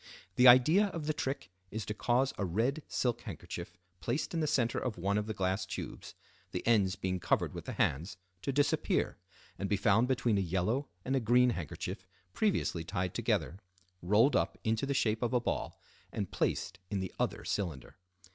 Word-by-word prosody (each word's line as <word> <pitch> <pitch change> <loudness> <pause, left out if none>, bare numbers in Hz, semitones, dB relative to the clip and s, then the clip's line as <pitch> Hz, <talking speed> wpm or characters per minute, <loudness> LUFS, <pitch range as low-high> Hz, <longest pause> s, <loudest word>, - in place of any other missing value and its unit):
The 125 - +7
idea 155 +12 +7
of 165 -6 -5
the 155 - 0
trick 130 -10 -3 0.2
is 110 0 -4
to 105 - -3
cause 125 +5 +1
a - - -2
red 115 - 0
silk 120 -2 -1
handkerchief 95 -9 -7 0.2
placed 125 +9 -2
in 165 - 0
the 155 - +1
center 120 -6 +1
of 120 -6 -3
one 100 +3 0
of 105 0 0
the 110 - -2
glass 95 +2 0
tubes, - - -7 0.3
the - - -4
ends 105 -5 +3
being 95 -1 -2
covered - - +1
with - - -7
the - - -4
hands, 80 +9 0 0.2
to 140 - -1
disappear, 145 +1 +1 0.4
and 100 - -2
be 105 - +2
found 105 +4 +3
between 120 -5 +2
a - - +2
yellow 95 - 0 0.2
and 135 - 0
a - - +3
green 125 +2 +4
handkerchief 85 -9 -5 0.3
previously 190 - 0
tied 90 0 -2
together, 90 - -1 0.4
rolled 105 +10 +4
up - - +1
into 110 +4 0
the 140 - 0
shape 110 -4 +1
of 120 0 0
a 125 - +4
ball, 120 - -3 0.3
and - - -3
placed 95 - -1
in 100 - -1
the 95 -1 -4
other - - -1
cylinder. 85 -9 -3
110 Hz, 190 wpm, -32 LUFS, 95-130 Hz, 0.4 s, The